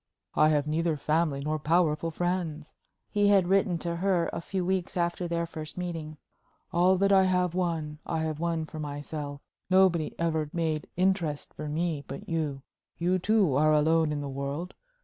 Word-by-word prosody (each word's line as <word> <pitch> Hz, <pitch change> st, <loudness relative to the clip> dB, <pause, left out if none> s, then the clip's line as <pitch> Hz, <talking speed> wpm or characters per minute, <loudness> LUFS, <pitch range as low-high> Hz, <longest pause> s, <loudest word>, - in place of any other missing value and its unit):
"I 155 Hz, -, +5 dB
have 145 Hz, -2 st, +2 dB
neither 160 Hz, +1 st, 0 dB
family 155 Hz, -1 st, 0 dB
nor 155 Hz, +2 st, -1 dB
powerful 165 Hz, +1 st, +2 dB
friends," 165 Hz, -3 st, -2 dB, 0.4 s
he 205 Hz, -1 st, +3 dB
had 195 Hz, -3 st, +5 dB
written 190 Hz, -2 st, +2 dB
to 170 Hz, 0 st, -3 dB
her 180 Hz, -2 st, +1 dB
a -, -, -3 dB
few 185 Hz, +1 st, -3 dB
weeks 185 Hz, -1 st, -1 dB
after 175 Hz, +1 st, 0 dB
their 170 Hz, 0 st, -1 dB
first 155 Hz, -1 st, -8 dB
meeting; 165 Hz, -4 st, -5 dB, 0.6 s
"all 180 Hz, +2 st, +4 dB
that 195 Hz, +1 st, +3 dB
I 190 Hz, -1 st, +6 dB
have 180 Hz, -2 st, +1 dB
won, 165 Hz, -4 st, -2 dB
I 160 Hz, -, -2 dB
have 155 Hz, -1 st, -2 dB
won 165 Hz, -1 st, -1 dB
for 155 Hz, -, -9 dB
myself. 145 Hz, -1 st, -5 dB, 0.3 s
Nobody 185 Hz, -4 st, +3 dB
ever 160 Hz, -3 st, 0 dB
made 160 Hz, -3 st, -1 dB
'interest' 180 Hz, -6 st, 0 dB
for 150 Hz, 0 st, -6 dB
me 160 Hz, -1 st, -1 dB
but 135 Hz, -, -7 dB
you. 150 Hz, -5 st, -2 dB, 0.3 s
You, 180 Hz, +2 st, +1 dB
too, 200 Hz, -5 st, +3 dB
are 155 Hz, +2 st, +4 dB
alone 160 Hz, +1 st, +3 dB
in 145 Hz, -1 st, -2 dB
the 145 Hz, -, -4 dB
world. 140 Hz, +6 st, -4 dB
165 Hz, 175 wpm, -28 LUFS, 150-180 Hz, 0.6 s, I